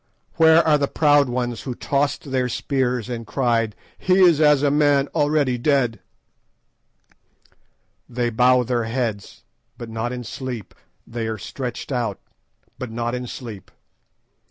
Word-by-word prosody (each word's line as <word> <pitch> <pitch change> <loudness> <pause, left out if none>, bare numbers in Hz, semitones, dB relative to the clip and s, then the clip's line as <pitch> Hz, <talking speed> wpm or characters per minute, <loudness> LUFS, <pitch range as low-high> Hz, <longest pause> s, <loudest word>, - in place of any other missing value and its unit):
"Where 160 0 +6
are 150 -1 +4
the 140 - +1
proud 145 -3 +3
ones 120 -1 -2
who 125 -3 -5
tossed 140 +1 -1
their 130 -1 0
spears 125 -2 -1
and 115 -3 -6
cried, 115 -5 0 0.2
'He 185 - +2
is 170 -5 +5
as 150 -2 +5
a 145 - +3
man 145 -1 +3
already 145 -4 +1
dead'? 125 -5 +1 2.1
"They 120 -1 -1
bow 125 +2 +4
their 120 -1 -1
heads, 115 -4 -4 0.3
but 120 -2 -8
not 115 +2 -3
in 125 -1 -5
sleep; 120 -2 -6 0.3
they 115 -1 -4
are 110 -1 -3
stretched 125 +5 -6
out, 120 -6 -2 0.6
but 130 - -5
not 120 +1 -3
in 125 0 -4
sleep. 115 -6 -8
125 Hz, 140 wpm, -22 LUFS, 115-140 Hz, 2.1 s, Where